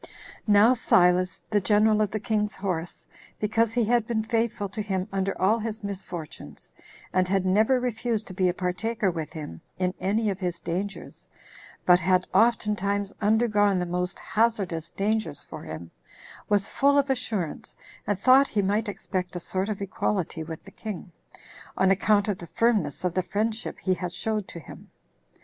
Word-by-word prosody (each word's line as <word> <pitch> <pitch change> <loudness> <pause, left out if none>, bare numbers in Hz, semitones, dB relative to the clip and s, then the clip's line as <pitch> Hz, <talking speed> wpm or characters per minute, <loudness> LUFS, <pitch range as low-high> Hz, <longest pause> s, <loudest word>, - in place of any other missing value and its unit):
1. 210 - +4
Now 220 +5 +7
Silas, 180 -5 +3
the 205 -1 +3
general 215 +2 +3
of 210 - +2
the 215 - -3
king's 210 0 -1
horse, 180 -4 -4 0.3
because 225 +1 +1
he 240 -2 +2
had 235 0 +2
been 220 -2 0
faithful 225 -2 -1
to 210 +3 -4
him 190 -2 -2
under 195 0 -1
all 210 +5 +3
his 220 0 -5
misfortunes, 185 -5 -7 0.4
and 185 0 +2
had 190 0 +1
never 220 +7 +3
refused 235 -2 -1
to 185 - -8
be 185 -1 +2
a - - 0
partaker 190 +3 -1
with 160 -3 -5
him 150 - -7 0.2
in 185 -1 0
any 210 +2 +1
of 190 - -5
his 180 -2 -2
dangers, 195 +4 -5 0.6
but 180 0 +6
had 185 +1 +2
oftentimes 205 -3 +2
undergone 210 -2 +3
the 180 - 0
most 180 +1 -2
hazardous 195 -8 0
dangers 205 -7 -1
for - - -9
him, 85 +1 -8 0.6
was 205 -1 +2
full 280 +1 +3
of 280 -1 +3
assurance, 220 - -3 0.3
and 205 - +1
thought 260 +6 +6
he 205 -2 0
might 210 +3 0
expect 185 -3 -4
a - - -2
sort 190 +3 -2
of 200 -2 -3
equality 185 -3 -2
with 160 0 -8
the 195 - -12
king, 200 -3 -7 0.7
on 190 0 +4
account 205 +2 +3
of 205 -3 -1
the 170 - -9
firmness 210 - +1
of 180 -2 0
the 185 - +1
friendship 215 +4 -2
he 185 - 0
had 180 0 -4
showed 215 +2 -2
to 170 - -8
him. 150 - -13
200 Hz, 175 wpm, -26 LUFS, 180-220 Hz, 0.7 s, Now